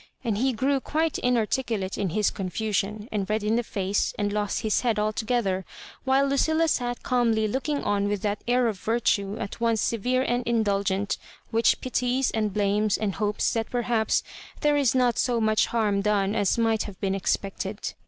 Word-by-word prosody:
And 220 -4 -1
he 265 +2 +2
grew 265 +4 +1
quite 315 +3 -1
inarticulate 230 -4 0
in 200 -3 -1
his 210 +5 +1
confusion, 210 +2 -2
and 200 -2 -2
red 215 0 0
in 215 +2 +1
the 240 - +2
face, 200 -3 -1
and 205 -1 -1
lost 210 -1 -1
his 215 -1 +1
head 235 -4 +1
altogether, 215 -2 0 0.4
while 265 +1 +3
Lucilla 315 +4 +2
sat 245 -3 -1
calmly 230 -3 +2
looking 280 +6 -2
on 205 0 +1
with 205 -1 -2
that 205 -1 -2
air 245 +1 +3
of 210 -4 -3
virtue 215 -2 0
at 210 +2 -6
once 230 -1 +2
severe 250 +5 +1
and 245 -1 0
indulgent, 200 -3 0 0.3
which 225 0 +3
pities, 255 +1 0
and 215 -2 0
blames, 205 +1 +1
and 210 -3 -1
hopes 210 0 +1
that 225 -1 -2
perhaps 235 -2 +1 0.4
there 295 -1 +3
is 275 -4 +2
not 250 -2 +2
so 245 -2 +1
much 215 -1 +2
harm 210 -4 +1
done 200 -1 +1
as 205 -2 +1
might 225 -1 +2
have 200 -3 -9
been 195 -1 0
expect 195 0 -1
ed. 205 +2 -5
220 Hz, 185 wpm, -26 LUFS, 205-245 Hz, 0.4 s, while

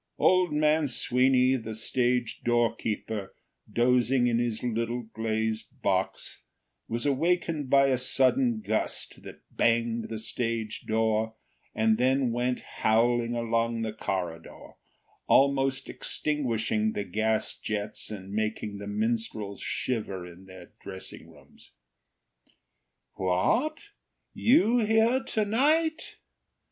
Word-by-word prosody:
Old 185 -2 +3
man 150 0 +2
Sweeny, 130 +1 +3
the 110 -2 -6
stage 120 +1 0
doorkeeper, 115 -3 -1 0.4
dozing 125 +1 +3
in 120 -1 +2
his 120 -2 -2
little 120 0 -2
glazed 110 0 -3
box, 95 -1 -1 0.5
was 115 +3 -3
awakened 160 0 0
by 140 0 +5
a 130 -2 +1
sudden 220 - +2
gust 110 - -3
that - - -12
banged 115 0 +1
the 110 - -4
stage 115 -1 -3
door 110 0 +1 0.4
and 110 0 +2
then 130 0 +2
went 125 +1 -1 0.2
howling 120 +2 +2
along 115 0 0
the 110 -1 -3
corridor, 90 -6 -5 0.6
almost 135 -1 +3
extinguishing 115 -7 -1
the 105 - -2
gas 110 +3 0
jets 105 -1 -4
and 100 -2 -8
making 110 -1 -2
the 100 - -7
minstrels 110 -1 -2
shiver 100 -7 -3
in 90 +2 -13
their 95 -1 -13
dressing - - -9
rooms. - - -20 1.4
"What! 95 - +1 0.6
You 245 -2 +4
here 225 +3 +3
to 215 -1 0
night!" 310 +9 +1
115 Hz, 110 wpm, -28 LUFS, 110-135 Hz, 1.4 s, by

